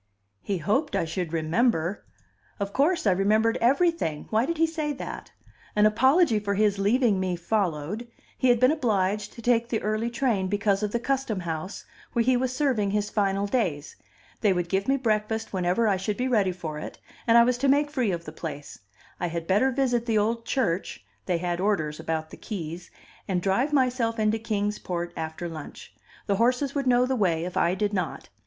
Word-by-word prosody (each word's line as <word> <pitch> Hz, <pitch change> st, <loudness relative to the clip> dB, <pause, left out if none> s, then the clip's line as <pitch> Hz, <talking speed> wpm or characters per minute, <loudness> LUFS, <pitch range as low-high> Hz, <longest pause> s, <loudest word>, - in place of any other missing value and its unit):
He 200 Hz, -, -2 dB
hoped 215 Hz, -, 0 dB
I -, -, +1 dB
should 170 Hz, 0 st, -3 dB
remember! 170 Hz, +3 st, 0 dB, 0.6 s
Of 200 Hz, 0 st, -3 dB
course 305 Hz, -, +2 dB
I 200 Hz, -, +5 dB
remembered 215 Hz, +4 st, +2 dB
everything; 275 Hz, -, +1 dB
why 225 Hz, +4 st, +2 dB
did 335 Hz, -, -2 dB
he 325 Hz, -, +4 dB
say 315 Hz, -2 st, -2 dB
that? 270 Hz, -, -7 dB, 0.4 s
An 210 Hz, 0 st, +5 dB
apology 260 Hz, +4 st, +4 dB
for 200 Hz, -1 st, -2 dB
his 205 Hz, -1 st, +2 dB
leaving 215 Hz, 0 st, +3 dB
me 185 Hz, -1 st, -1 dB
followed; 180 Hz, +2 st, -2 dB, 0.3 s
he 255 Hz, -, +2 dB
had 240 Hz, -1 st, +4 dB
been 255 Hz, +3 st, +5 dB
obliged 210 Hz, -7 st, 0 dB
to 230 Hz, -, -11 dB
take 235 Hz, 0 st, +2 dB
the 225 Hz, -, 0 dB
early 215 Hz, +2 st, 0 dB
train 235 Hz, -6 st, 0 dB
because 205 Hz, 0 st, +1 dB
of 210 Hz, -, 0 dB
the 235 Hz, -, 0 dB
Custom 260 Hz, -6 st, -1 dB
House, 165 Hz, +2 st, -5 dB, 0.3 s
where 235 Hz, -1 st, +2 dB
he 255 Hz, 0 st, +4 dB
was 250 Hz, 0 st, 0 dB
serving 255 Hz, -7 st, +1 dB
his 210 Hz, +1 st, -1 dB
final 200 Hz, -1 st, +1 dB
days; 185 Hz, -, -1 dB, 0.4 s
they 210 Hz, -, +3 dB
would 175 Hz, -1 st, -2 dB
give 195 Hz, +2 st, 0 dB
me 270 Hz, +1 st, +3 dB
breakfast 220 Hz, -3 st, -1 dB
when 185 Hz, -2 st, -1 dB
ever 190 Hz, +6 st, +2 dB
I 200 Hz, -2 st, +2 dB
should 205 Hz, +2 st, -3 dB
be 255 Hz, -, 0 dB
ready 210 Hz, -7 st, +2 dB
for 160 Hz, -4 st, -6 dB
it, -, -, -7 dB, 0.3 s
and 230 Hz, 0 st, +6 dB
I 235 Hz, -, +8 dB
was 245 Hz, 0 st, +1 dB
to 275 Hz, -, +1 dB
make 290 Hz, +2 st, +3 dB
free 255 Hz, -7 st, 0 dB
of 170 Hz, -1 st, -4 dB
the 155 Hz, -, -7 dB
place; 155 Hz, -2 st, -7 dB, 0.4 s
I 175 Hz, -, -1 dB
had 170 Hz, 0 st, -4 dB
better 205 Hz, +9 st, +3 dB
visit 250 Hz, -3 st, 0 dB
the 225 Hz, -2 st, +2 dB
old 230 Hz, +2 st, 0 dB
church 190 Hz, -, -1 dB, 0.2 s
(they 175 Hz, -, +1 dB
had 175 Hz, 0 st, -2 dB
orders 160 Hz, -7 st, 0 dB
about 160 Hz, -1 st, -3 dB
the -, -, -10 dB
keys) 175 Hz, -4 st, -6 dB, 0.4 s
and 190 Hz, -3 st, 0 dB
drive 200 Hz, +10 st, +1 dB
myself 250 Hz, -4 st, +1 dB
into 215 Hz, 0 st, +1 dB
Kings 210 Hz, -2 st, -2 dB
Port 175 Hz, -1 st, -4 dB
after 160 Hz, +2 st, -4 dB
lunch; 160 Hz, -3 st, -9 dB, 0.3 s
the 200 Hz, -2 st, +1 dB
horses 250 Hz, +4 st, +1 dB
would 275 Hz, -2 st, -1 dB
know 245 Hz, 0 st, +4 dB
the 260 Hz, +1 st, 0 dB
way, 170 Hz, -7 st, +1 dB
if 180 Hz, -, -6 dB
I 175 Hz, +2 st, +2 dB
did 205 Hz, +2 st, -1 dB
not. 180 Hz, -4 st, -3 dB
210 Hz, 200 wpm, -26 LUFS, 180-245 Hz, 0.6 s, I